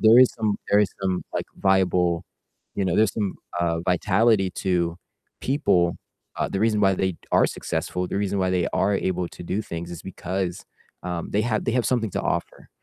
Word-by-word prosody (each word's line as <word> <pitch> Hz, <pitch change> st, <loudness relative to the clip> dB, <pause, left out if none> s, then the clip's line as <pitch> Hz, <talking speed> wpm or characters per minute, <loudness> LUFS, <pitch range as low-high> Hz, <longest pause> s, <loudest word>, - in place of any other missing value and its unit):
there 110 Hz, +2 st, +7 dB
is 130 Hz, -, +6 dB
some, 105 Hz, -2 st, +1 dB
there 105 Hz, -, +6 dB
is 105 Hz, -, +2 dB
some, 95 Hz, -1 st, 0 dB
like, -, -, -2 dB
viable 90 Hz, -2 st, +2 dB, 0.5 s
you 100 Hz, -, +1 dB
know, 90 Hz, -2 st, +1 dB
there's 110 Hz, -1 st, +4 dB
some, 105 Hz, -4 st, -1 dB, 0.3 s
uh, 85 Hz, -1 st, +1 dB
vitality 95 Hz, +2 st, +3 dB
to 85 Hz, -3 st, 0 dB, 0.4 s
people. 90 Hz, -, +2 dB, 0.4 s
Uh, -, -, 0 dB
the 95 Hz, -, -2 dB
reason 110 Hz, -1 st, +2 dB
why 95 Hz, -1 st, +5 dB
they 95 Hz, -2 st, -1 dB, 0.2 s
are -, -, +5 dB
successful, 90 Hz, 0 st, -3 dB
the -, -, -3 dB
reason 100 Hz, 0 st, 0 dB
why 95 Hz, -1 st, +1 dB
they 90 Hz, -2 st, +1 dB
are 100 Hz, 0 st, +2 dB
able 90 Hz, -2 st, -1 dB
to -, -, -11 dB
do 100 Hz, +5 st, -1 dB
things 85 Hz, -3 st, -6 dB
is 85 Hz, -, -8 dB
because, 95 Hz, -1 st, -4 dB, 0.4 s
um, 90 Hz, -1 st, -4 dB
they 105 Hz, -, +2 dB
have, 110 Hz, -2 st, 0 dB
they -, -, +1 dB
have 125 Hz, -1 st, +1 dB
something 115 Hz, -5 st, +1 dB
to -, -, -2 dB
offer. -, -, -3 dB
95 Hz, 195 wpm, -24 LUFS, 90-105 Hz, 0.5 s, there